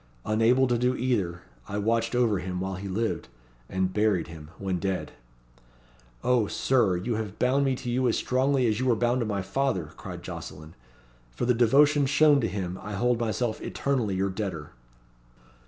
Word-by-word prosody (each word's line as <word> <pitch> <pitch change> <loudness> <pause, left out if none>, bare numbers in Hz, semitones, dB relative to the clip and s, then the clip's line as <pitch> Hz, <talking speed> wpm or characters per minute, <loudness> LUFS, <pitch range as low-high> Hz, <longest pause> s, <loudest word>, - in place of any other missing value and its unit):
Unable 115 +5 +3
to 120 -2 +1
do 125 +1 +2
either, 100 - -1 0.2
I 100 - -4
watched 115 +3 0
over 115 -5 +2
him 90 0 -4
while 95 +1 -3
he 95 +2 -6
lived 110 - -2 0.4
and 95 0 -1
buried 105 -5 +1
him 80 -2 -10
when 95 -2 -2
dead." 95 +1 -2 1.1
"O 125 -4 +3
Sir, 110 -9 +2
you 110 +5 -2
have 105 -3 -5
bound 135 +3 +2
me 135 -1 +1
to 125 - -8
you 125 +1 +1
as 115 - +1
strongly 130 +1 +1
as 110 -1 +1
you 130 - 0
were 120 - +4
bound 120 +3 +1
to 115 - -1
my 100 -3 -2
father," 95 - -1
cried - - -8
Jocelyn. 80 +1 -8 0.6
"For - - -3
the 125 - +4
devotion 140 +5 +4
shown 145 0 +5
to - - +1
him, 90 -1 -4
I 105 - -6
hold 120 +4 +1
myself 115 0 -1
eternally 125 -8 -1
your 95 +1 0
debtor." 95 -7 -5
110 Hz, 180 wpm, -27 LUFS, 95-125 Hz, 1.1 s, shown